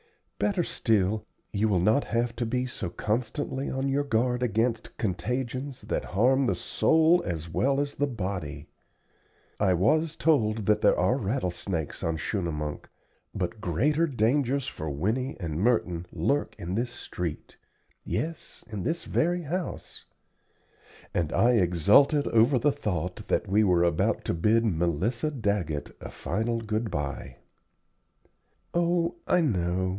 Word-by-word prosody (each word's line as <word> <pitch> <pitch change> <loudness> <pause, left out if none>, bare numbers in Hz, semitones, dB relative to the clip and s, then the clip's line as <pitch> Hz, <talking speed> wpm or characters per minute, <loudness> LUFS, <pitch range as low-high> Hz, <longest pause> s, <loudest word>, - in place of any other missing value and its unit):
Better 195 -4 +1
still, 110 - 0 0.3
you 110 +1 +1
will 95 -3 +2
not 110 +10 +3
have 120 0 -1
to 120 - -1
be 125 +2 0
so 110 -7 -4
constantly 125 - -2
on 135 +1 -1
your 140 +1 +1
guard 125 -1 +1
against 115 -1 -1
contagions 125 - -3
that - - -2
harm 130 +4 +4
the - - +1
soul 160 +2 +3
as 85 -2 -4
well 135 +11 +1
as 145 0 -1
the 145 - 0
body. 90 - -4 0.9
I 95 -3 +3
was 155 - +2
told 115 -7 +2
that 105 +1 +3
there - - +4
are 125 - +2
rattle 100 -5 -1
snakes 85 -4 -4
on 80 -1 -1
Schunemunk, 75 -5 -3 0.5
but 95 +2 -3
greater 150 - +1
dangers 135 +1 +1
for 80 -11 -5
Winnie 110 - -1
and 80 -4 -3
Merton 90 -7 +1
lurk 135 - 0
in 85 +2 -5
this 120 +4 0
street 90 -8 -6 0.5
yes, 165 +1 -4
in 105 -3 -5
this 165 - -2
very 175 +2 0
house;" 175 +4 -5 1.1
and 85 -3 0
I 120 - +4
exulted 105 - +4
over 115 +4 +4
the 145 +4 +3
thought 90 - -3
that - - 0
we 105 +3 +3
were 90 -4 +3
about 85 -2 +1
to - - 0
bid 110 +7 +2
Melissa 95 - 0
Daggett 100 - -2
a - - -7
final 115 +4 -2
good 110 +1 -2
by. 70 -5 -4 1.4
"Oh, 175 0 +1
I 180 - +4
know. 95 - 0
110 Hz, 140 wpm, -27 LUFS, 90-135 Hz, 1.4 s, harm